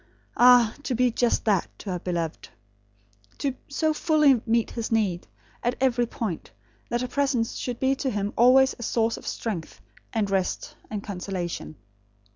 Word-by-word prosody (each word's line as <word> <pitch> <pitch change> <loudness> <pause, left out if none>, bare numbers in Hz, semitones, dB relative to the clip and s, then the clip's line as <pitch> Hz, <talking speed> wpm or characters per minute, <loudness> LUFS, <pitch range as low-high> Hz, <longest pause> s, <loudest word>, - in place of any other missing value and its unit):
Ah, 245 -2 +6
to 260 -3 -2
be 250 +1 +3
just 240 +1 +1
that 205 -5 +2
to 200 - -6
her 180 - -2
beloved! 170 -3 -3 0.9
To 275 -2 -1
so 310 +2 0
fully 300 -6 +4
meet 230 0 +2
his 230 -1 -4
need, 200 -6 0 0.3
at 240 +1 0
every 245 -2 +2
point, 210 -8 -4 0.4
that 240 0 0
her 250 - -2
presence 260 -4 0
should 245 -2 -4
be 265 0 +2
to 270 - -1
him 205 -2 -2
always 260 +3 +6
a - - -8
source 230 -1 +1
of - - -11
strength, 190 -9 -4 0.3
and 220 -3 0
rest, 190 -2 -1
and 210 -2 -4
consolation. 180 -5 -5
230 Hz, 160 wpm, -26 LUFS, 200-255 Hz, 0.9 s, Ah